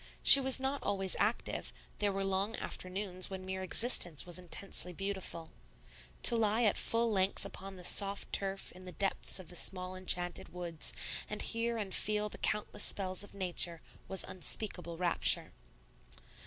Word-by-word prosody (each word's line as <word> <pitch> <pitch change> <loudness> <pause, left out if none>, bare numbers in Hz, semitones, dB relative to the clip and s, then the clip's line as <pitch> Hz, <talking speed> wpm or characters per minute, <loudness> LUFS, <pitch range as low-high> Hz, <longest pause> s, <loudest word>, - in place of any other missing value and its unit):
She 275 - +14
was 265 0 0
not 270 +1 -3
always 195 -2 -1
active; 215 +3 -2 0.3
there 205 -1 0
were 195 0 -4
long 195 +3 -2
afternoons 185 -1 -2
when 190 -1 -8
mere 190 0 -5
existence 185 - +3
was 175 0 -4
intensely 180 0 -1
beautiful. 190 -3 -6 0.7
To 240 - +5
lie 220 +1 0
at 210 - +2
full 230 0 0
length 190 -1 -1
upon 195 0 -10
the 180 - -13
soft 200 +2 +2
turf 195 0 0
in 185 +1 -15
the 180 - -10
depths 195 +3 -4
of 185 -3 -9
the 175 - -10
small 185 +1 -2
enchanted 175 -1 +2
woods, 170 -3 -5 0.4
and 210 - -6
hear 230 0 -1
and 200 -4 -5
feel 210 0 +1
the - - -12
countless 210 0 -2
spells 185 -1 -2
of 205 - -14
Nature, 175 -3 -1 0.3
was 190 - -1
unspeakable 180 -2 -2
rapture. 175 0 +1
195 Hz, 160 wpm, -32 LUFS, 180-210 Hz, 0.7 s, She